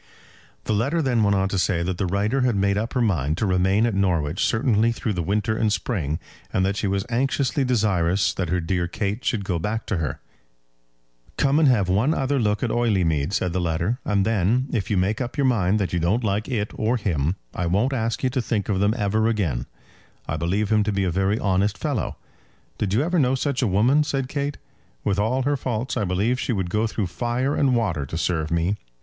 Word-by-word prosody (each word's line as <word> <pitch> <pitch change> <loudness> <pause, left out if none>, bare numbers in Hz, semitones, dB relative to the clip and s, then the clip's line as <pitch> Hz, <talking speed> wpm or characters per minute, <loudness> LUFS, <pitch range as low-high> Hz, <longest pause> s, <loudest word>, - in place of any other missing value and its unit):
The - - -1
letter 135 +11 +1
then 130 -7 +1
went 100 -1 +3
on 95 0 +1
to 100 - -1
say 85 -2 +1
that 90 0 -3
the 95 - 0
writer 105 +8 0
had 125 -3 +2
made 100 0 +2
up 110 +3 -2
her 125 - +1
mind 80 - 0
to 110 - 0
remain 95 +3 +2
at 115 - 0
Norwich 90 -5 0
certainly 115 0 +2
through 110 -2 -2
the 90 - -2
winter 105 +5 0
and 110 -1 +1
spring, 90 - -1 0.3
and 95 - +1
that 100 +1 0
she 105 - -1
was 95 0 -1
anxiously 135 +3 0
desirous 100 -6 +1
that 90 -4 -3
her 90 +1 +1
dear 85 +1 -1
Kate 100 +5 -3
should 105 -5 -1
go 90 -3 -1
back 110 +6 -2
to 100 - -1
her. 80 -5 -3 1.2
"Come 140 +2 +3
and 155 - +5
have 110 -8 +3
one 110 - +2
other 135 +1 0
look 105 -3 0
at 120 - 0
Oileymead," 90 -11 +1
said 90 -3 -1
the 90 - 0
letter, 85 +8 -1
"and 100 -2 +1
then, 115 +5 +1
if 100 -5 -2
you 105 - +1
make 100 +6 0
up 125 +3 -4
your 140 - +2
mind 105 -6 +2
that 100 -4 -2
you 85 - +1
don't 95 +9 +1
like 105 +2 -1
it 105 -5 -1
or 115 +3 0
him, 85 - -1 0.2
I 90 - -2
won't 105 +10 +1
ask 115 -1 -2
you 130 - +1
to 130 - 0
think 110 -3 -2
of 95 -2 +1
them 100 +3 +2
ever 110 +1 +1
again. 90 - -1 0.6
I 75 - -2
believe 95 +6 -1
him 110 -1 +4
to 105 - 0
be 100 -1 0
a 90 - 0
very 95 +4 +1
honest 100 0 +1
fellow." 145 -7 -2 0.6
"Did 100 - -1
you 125 - +3
ever 175 +2 +1
know 130 -2 +3
such 140 0 -1
a 125 - +2
woman?" 120 +10 +3
said 135 -3 -2
Kate; 140 0 -2 0.5
"with 100 0 0
all 125 +5 +1
her 145 +2 +1
faults 125 -2 -3
I 105 - 0
believe 100 +8 0
she - - -1
would 95 -4 -2
go 110 +3 +1
through 110 -2 -2
fire 120 +9 -1
and 135 -3 +2
water 90 -12 -1
to 80 - -4
serve 80 -2 -1
me. 85 +5 0
105 Hz, 225 wpm, -23 LUFS, 95-120 Hz, 1.2 s, and